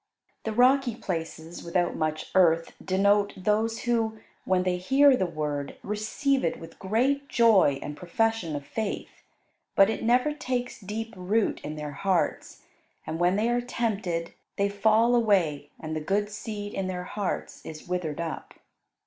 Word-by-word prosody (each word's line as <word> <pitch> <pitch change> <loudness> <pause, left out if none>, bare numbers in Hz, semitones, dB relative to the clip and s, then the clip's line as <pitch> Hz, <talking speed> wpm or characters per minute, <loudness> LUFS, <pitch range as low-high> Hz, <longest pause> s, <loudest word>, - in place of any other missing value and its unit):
The 220 - -1
rocky 250 +1 +4
places 165 -4 -5
without 175 0 0
much 155 -1 -2
earth 165 -3 +4
denote 200 +2 +2
those 215 +4 0
who, 225 -2 0 0.3
when 185 -1 +2
they 180 -1 0
hear 270 +9 +5
the 190 -7 0
Word, 150 -3 -3
receive 240 +7 0
it 165 - -1
with 165 0 -12
great 265 +8 0
joy 215 - +5
and 145 - -5
profession 180 -1 -1
of 145 -1 -5
faith; 220 +3 -4 0.5
but 195 +2 +6
it - - -4
never 250 +6 +3
takes 250 -5 -3
deep 220 +3 -5
root 200 +4 0
in 150 +1 -5
their 150 -1 -5
hearts, 180 +4 -1 0.4
and 160 - -4
when 175 +2 +3
they 215 +3 +1
are 240 0 +1
tempted 205 -9 -2 0.2
they 200 0 +1
fall 220 +4 +3
away 185 -11 +2
and 155 0 -5
the 155 - -2
good 205 +6 0
seed 210 -1 -6
in 195 -1 -2
their 180 -1 -3
hearts 200 +1 -4
is 155 +1 -9
withered 175 -4 -2
up. 165 -1 -5
200 Hz, 155 wpm, -27 LUFS, 170-225 Hz, 0.5 s, but